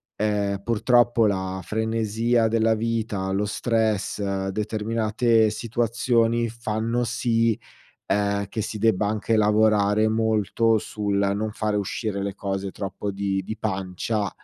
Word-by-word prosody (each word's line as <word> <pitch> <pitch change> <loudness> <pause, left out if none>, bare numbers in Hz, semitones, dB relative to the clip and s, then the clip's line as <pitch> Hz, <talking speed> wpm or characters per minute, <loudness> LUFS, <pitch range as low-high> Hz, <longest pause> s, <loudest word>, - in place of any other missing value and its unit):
Ehm, 100 -2 -1
purtroppo 120 0 +3
la 95 -1 -2
frenesia 110 +3 0
della 110 0 +2
vita, 110 -4 -2
lo 100 +2 0
stress, 105 -3 -1
determinate 110 +2 +1
situazioni 115 +1 0
fanno 115 +1 -2
sì, 115 -1 +1 0.5
ehm, 100 0 0
che 110 - -3
si 110 +1 -4
debba 105 -2 +2
anche 110 +1 0
lavorare 105 0 +3
molto 110 0 +2
sul 105 -1 -2 0.2
non 110 +1 -2
fare 105 -1 -1
uscire 100 0 -3
le 100 0 -3
cose 95 -1 -3
troppo 100 +1 -4
di 95 0 -1
di 110 +4 -6
pancia, 100 +1 -2
110 Hz, 120 wpm, -24 LUFS, 100-115 Hz, 0.5 s, purtroppo